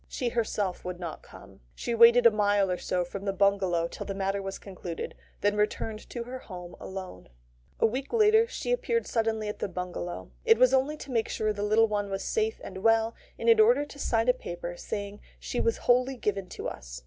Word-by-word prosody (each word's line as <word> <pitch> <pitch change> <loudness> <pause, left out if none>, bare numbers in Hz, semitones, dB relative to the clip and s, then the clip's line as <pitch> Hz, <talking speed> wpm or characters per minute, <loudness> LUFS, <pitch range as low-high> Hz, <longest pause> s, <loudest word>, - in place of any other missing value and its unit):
She 245 - -2
herself 210 -5 -1
would 180 -1 -5
not 170 -3 -6
come. - - -15 0.2
She 235 - -3
waited 235 +1 +7
a 235 - +9
mile 205 -2 +2
or 180 - -2
so 180 -1 -1
from 195 +3 -7
the 195 - +1
bungalow 190 -3 +2
till - - -8
the 195 - -3
matter 195 0 -1
was 195 0 -5
concluded, 180 -4 -6 0.3
then 205 0 +2
returned 215 +1 -2
to 240 - -4
her 255 +2 -7
home 180 -6 -9
alone. 190 - -8 0.5
A - - +4
week 260 +5 -2
later 440 0 +5
she - - -4
appeared 470 -1 0
suddenly 220 -2 -1
at 210 - -5
the - - -1
bungalow. 180 -1 -5
It 455 -1 +5
was 255 0 +5
only 270 +3 +2
to 280 - -9
make 230 -2 0
sure 215 -1 0
the 205 - -5
little 215 +2 +4
one 205 -1 -2
was 195 0 -3
safe 445 0 -1
and 190 - -7
well, 225 +2 +3 0.2
and - - -4
in 455 -1 +6
order 435 -8 +5
to 285 - -13
sign 225 -3 +1
a 250 - +6
paper 175 -7 -6
saying 200 +2 -5 0.2
she - - -3
was 460 - +1
wholly 255 +2 +3
given 200 -5 -2
to - - -5
us. - - -7
210 Hz, 215 wpm, -28 LUFS, 195-250 Hz, 0.5 s, a